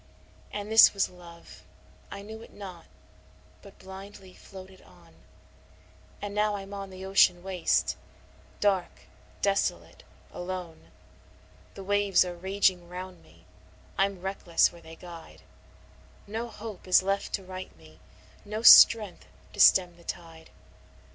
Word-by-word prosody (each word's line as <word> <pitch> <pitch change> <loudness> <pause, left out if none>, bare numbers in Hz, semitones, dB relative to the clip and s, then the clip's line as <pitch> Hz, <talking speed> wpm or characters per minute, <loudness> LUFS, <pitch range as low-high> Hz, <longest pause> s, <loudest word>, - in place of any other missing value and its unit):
II - - -4
And 205 +2 -9
this 220 -1 +7
was 195 - 0
Love, 170 -2 -15 0.5
I 200 - -8
knew 220 +2 -10
it - - -14
not, 185 -5 -11 0.7
but 200 -1 -16
blindly 190 0 -12
floated 190 0 -14
on, - - -21 1.1
And 205 0 -5
now 210 0 0
I'm 195 0 -8
on 195 -1 -7
the 190 0 -10
ocean 190 -2 +3
waste, 185 -3 0 0.6
dark, 195 -3 0 0.4
desolate, 200 0 -1 0.3
alone; 175 -2 -7 0.9
The 195 - -9
waves 205 -1 +2
are 180 - -5
raging 185 -1 0
round 185 0 -9
me 85 +1 -22 0.5
I'm 195 -2 -1
reckless 185 -3 +1
where 170 - -15
they 160 0 -13
guide; 170 -1 -13 0.8
No 225 +3 -5
hope 220 -4 -10
is 185 0 +5
left 195 +1 -2
to 195 - -2
right 185 - -9
me, 80 0 -19 0.4
no 215 +2 -6
strength 215 -5 +7 0.3
to 205 - -11
stem 180 -3 +5
the 170 - -19
tide. 165 -1 -9
190 Hz, 135 wpm, -27 LUFS, 175-200 Hz, 1.1 s, this